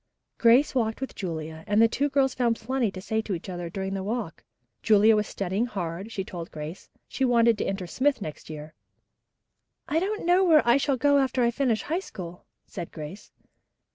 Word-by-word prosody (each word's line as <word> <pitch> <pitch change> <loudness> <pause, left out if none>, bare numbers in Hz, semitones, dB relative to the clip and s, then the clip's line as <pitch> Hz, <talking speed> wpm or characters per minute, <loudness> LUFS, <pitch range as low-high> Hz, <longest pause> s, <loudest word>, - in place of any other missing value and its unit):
Grace 240 +5 +5
walked 225 -4 0
with 265 - -5
Julia, 160 -3 -5
and 205 0 +2
the 230 - +7
two 280 +5 0
girls 270 -2 +2
found 235 -2 +1
plenty 240 +1 -1
to 190 - -8
say 220 +3 -1
to 205 -3 -3
each 165 - -8
other 175 -2 -5
during 190 +2 -4
the 195 - -2
walk. 210 -3 -4 0.4
Julia 215 +1 +5
was 210 -1 0
studying 200 +5 -2
hard, 190 -1 -5
she 195 - -3
told 175 -3 -7
Grace. 155 +3 -8 0.2
She 270 - -3
wanted 235 -2 +4
to - - -1
enter 195 -1 -3
Smith 265 +10 +1
next 155 -6 -8
year. 155 0 -8 1.1
"I 315 - +1
don't 410 +3 -2
know 355 +2 +4
where 315 -8 +5
I 240 +2 +6
shall 280 -1 +1
go 285 +2 +4
after 260 -2 +1
I 235 - +3
finish 240 -3 0
High 330 +4 -1
School," 180 - -9 0.2
said 170 - -7
Grace. 155 +6 -9
220 Hz, 200 wpm, -26 LUFS, 185-260 Hz, 1.1 s, the